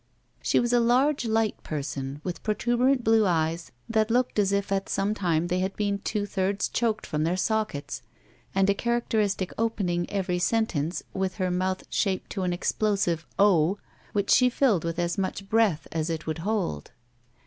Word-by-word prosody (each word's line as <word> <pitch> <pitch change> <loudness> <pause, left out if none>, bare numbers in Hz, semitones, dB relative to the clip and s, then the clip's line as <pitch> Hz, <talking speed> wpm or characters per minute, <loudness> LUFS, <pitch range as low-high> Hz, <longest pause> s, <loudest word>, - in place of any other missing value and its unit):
She - - +2
was 240 0 +1
a 240 - +5
large, 250 +3 +3
Ught 220 -1 0
person 140 -2 -4
with 180 - -4
protuberant 240 +4 +1
blue 225 0 +4
eyes 165 -1 0 0.2
that 220 -1 +1
looked 245 -1 +1
as 200 -1 +3
if 200 0 0
at 195 0 -1
some 200 +2 0
time 170 -5 0
they 180 +1 0
had 190 +1 -2
been 200 -1 -1
two 205 0 -2
thirds 195 0 -1
choked 225 -2 -1
from 150 0 -1
their 170 +3 0
sockets 215 -7 -1 0.5
and 195 0 +3
a 200 - +4
characteristic 215 -4 0
of - - -13
opening 195 -6 0
every 185 -3 -1
sentence 180 -6 0
with 190 -1 -2
her 185 -3 -1
mouth 185 +1 -1
shaped 190 -2 -1
to 195 - -3
an 180 -1 0
explosive 175 -2 0
O, 190 -2 +4 0.3
which 200 -1 0
she 250 0 +6
filled 240 - +2
with 165 0 -3
as 175 +3 -1
much 195 +1 -3
breath 215 -7 +2
as 160 0 -1
it 160 -1 -3
would 160 0 -3
hold. 180 - -2
195 Hz, 180 wpm, -26 LUFS, 175-220 Hz, 0.5 s, she